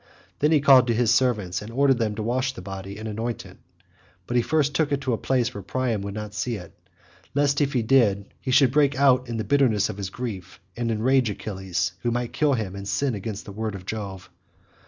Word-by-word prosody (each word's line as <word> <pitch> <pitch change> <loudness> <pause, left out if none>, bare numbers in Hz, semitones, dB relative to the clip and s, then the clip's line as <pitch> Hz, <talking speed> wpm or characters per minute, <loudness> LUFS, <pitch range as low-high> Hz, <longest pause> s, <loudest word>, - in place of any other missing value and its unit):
Then 150 +2 +3
he 155 -3 +4
called 135 -3 +7
to 115 - +1
his 120 0 +3
servants 105 -9 +1
and 105 +2 -8
ordered 135 0 +3
them 110 -2 0
to 110 - -4
wash 130 +3 0
the 90 - -9
body 95 +1 -7
and 110 +1 -6
anoint 115 +2 -4
it, - - -14 0.7
but 120 - -4
he 120 - +5
first 145 +2 +1
took 150 0 +1
it 140 - +1
to 130 -3 -1
a - - 0
place 125 -2 0
where 100 - -6
Priam 120 +1 -1
should 100 0 -5
not 105 -1 -6
see 120 +2 -2
it, 90 -5 -10 0.6
lest 145 0 +2
if 140 0 +1
he 125 -3 +1
did 110 -5 +4
so, 100 - -12 0.2
he - - -5
should 130 0 +5
break 145 -1 +3
out 130 -2 +3
in 115 - -3
the 110 - -1
bitterness 125 -7 +2
of 105 - -6
his 100 -2 -4
grief, 95 -7 -6 0.2
and 120 -1 -2
enrage 120 +2 +2
Achilles, 95 -3 -3
who 120 - 0
might 120 0 -1
then - - -10
kill 150 -2 +4
him 100 -5 -4
and 100 0 -7
sin 135 +5 0
against 105 0 -5
the 100 - -8
word 110 0 -4
of 90 -2 -9
Jove. 100 -3 -6
115 Hz, 240 wpm, -24 LUFS, 105-130 Hz, 0.7 s, called